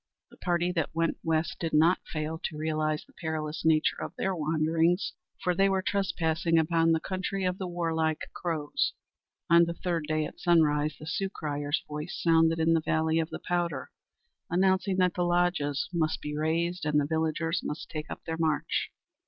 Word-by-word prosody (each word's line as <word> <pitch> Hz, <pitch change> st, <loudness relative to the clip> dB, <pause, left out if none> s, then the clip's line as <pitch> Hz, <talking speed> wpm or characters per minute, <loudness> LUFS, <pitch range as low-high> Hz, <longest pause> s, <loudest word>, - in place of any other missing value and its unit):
The -, -, -17 dB
party 175 Hz, 0 st, 0 dB
that 165 Hz, -3 st, -2 dB
went 165 Hz, 0 st, +1 dB
west 160 Hz, 0 st, 0 dB
did 165 Hz, -2 st, -2 dB
not 165 Hz, +4 st, +5 dB
fail 155 Hz, +1 st, -3 dB
to 155 Hz, -, -4 dB
realize 155 Hz, 0 st, -1 dB
the -, -, -24 dB
perilous 160 Hz, -1 st, -4 dB
nature 160 Hz, -1 st, +3 dB
of -, -, -5 dB
their 190 Hz, -1 st, -1 dB
wanderings, 160 Hz, +3 st, +1 dB, 0.3 s
for 180 Hz, -, +2 dB
they 195 Hz, +2 st, +3 dB
were 190 Hz, -1 st, +1 dB
trespassing 170 Hz, -4 st, +1 dB
upon 165 Hz, 0 st, +3 dB
the 160 Hz, -, +3 dB
country 190 Hz, +2 st, -3 dB
of 180 Hz, 0 st, -1 dB
the 190 Hz, -, -3 dB
warlike 160 Hz, -2 st, -1 dB
Crows. 160 Hz, -4 st, -1 dB, 0.5 s
On 170 Hz, +1 st, +6 dB
the 170 Hz, 0 st, -4 dB
third 170 Hz, -4 st, -2 dB
day 155 Hz, -1 st, 0 dB
at -, -, -9 dB
sunrise, 155 Hz, -4 st, +3 dB
the 155 Hz, -, -9 dB
Sioux 190 Hz, +4 st, -1 dB
crier's 145 Hz, -4 st, -2 dB
voice 150 Hz, +4 st, -5 dB
resounded 165 Hz, 0 st, +4 dB
in 165 Hz, +1 st, +3 dB
the 165 Hz, -, +3 dB
valley 160 Hz, +1 st, +1 dB
of 160 Hz, 0 st, -1 dB
the -, -, -7 dB
Powder, 170 Hz, -7 st, -1 dB, 0.6 s
announcing 190 Hz, +2 st, +2 dB
that 180 Hz, -2 st, +3 dB
the 180 Hz, -, -2 dB
lodges 175 Hz, -5 st, +1 dB
must 160 Hz, -2 st, 0 dB
be 150 Hz, 0 st, -5 dB
razed 170 Hz, +3 st, 0 dB
and 150 Hz, -1 st, +2 dB
the 145 Hz, -, +1 dB
villagers 160 Hz, +2 st, 0 dB
must 150 Hz, -, -4 dB
take 155 Hz, -1 st, -6 dB
up -, -, -7 dB
their 160 Hz, -1 st, -3 dB
march. 160 Hz, -2 st, 0 dB
165 Hz, 185 wpm, -29 LUFS, 155-175 Hz, 0.6 s, On